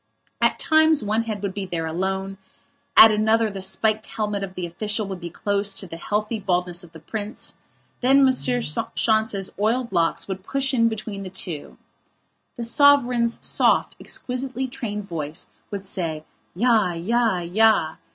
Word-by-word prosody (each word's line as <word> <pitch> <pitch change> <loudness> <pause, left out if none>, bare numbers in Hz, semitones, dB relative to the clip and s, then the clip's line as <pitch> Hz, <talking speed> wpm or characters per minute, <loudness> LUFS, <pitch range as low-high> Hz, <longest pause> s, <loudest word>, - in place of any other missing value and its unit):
At - - +3
times 315 -3 +4
one 215 +2 +1
head 210 -3 -4
would 200 -2 -2
be 200 -1 -4
there 170 -2 -3
alone, 190 +3 -3 0.6
at 220 - +11
another 220 +1 +2
the 195 -1 -6
spiked 215 +3 +1
helmet 210 -2 -3
of 190 -1 -7
the 180 - -3
official 210 +5 -2
would 190 -2 -5
be 170 -1 -6
close 200 +3 -1
to - - -5
the 165 -2 -8
healthy 210 +5 -2
baldness 180 -2 -1
of 170 - -15
the 165 - -12
prince; 210 +7 -5 0.5
then 270 +2 +5
M. - - +5 0.6
Schontz's 220 -3 +1
oiled 235 +3 0
locks 170 -3 0
would 190 -1 -5
push 270 +5 0
in 230 -2 +3
between 215 -2 -5
the 190 - -6
two. 170 -5 -5 0.8
The 240 - -5
sovereign's 245 -2 +3
soft, - - +2
exquisitely 255 +1 -4
trained 210 -5 -5
voice 160 -1 -4 0.2
would 200 -1 -6
say, 165 -5 -3 0.3
"Ja, 220 -3 +3
ja, 220 +4 +1
ja!" 175 -2 +2
205 Hz, 160 wpm, -23 LUFS, 185-230 Hz, 0.8 s, at